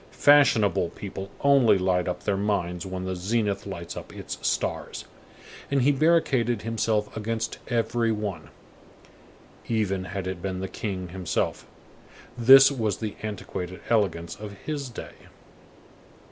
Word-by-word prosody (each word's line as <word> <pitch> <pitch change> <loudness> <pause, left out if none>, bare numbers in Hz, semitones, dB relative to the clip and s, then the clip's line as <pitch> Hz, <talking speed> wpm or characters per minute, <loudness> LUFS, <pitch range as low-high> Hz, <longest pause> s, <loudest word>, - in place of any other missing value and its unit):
Fashionable 110 -11 +5
people 95 +1 -7
only 135 -7 +5
light 90 -1 +1
up 90 0 -3
their 100 - +1
minds 95 -3 -1
when 95 0 -5
the 95 0 -2
zenith 100 +2 -1
lights 85 -4 -6
up - - -8
its - - -7
stars." - - -2 0.6
And 140 -2 +2
he 145 - +5
barricaded 135 -7 +2
himself 110 -2 -1
against 110 +1 -3
every 115 -1 +1
one, 105 -7 -4 1.2
even 100 -5 0
had 95 +1 -5
it 95 -2 -4
been 95 -1 -3
the 95 - -3
king 95 -3 -5
himself. 90 -1 -2 0.7
This 135 +3 +8
was 110 -7 -1
the 110 -2 -4
antiquated 95 -3 -5
elegance 85 -7 +1
of 105 -1 -8
his 145 -4 -3
day. 120 - -8
105 Hz, 130 wpm, -26 LUFS, 95-115 Hz, 1.2 s, This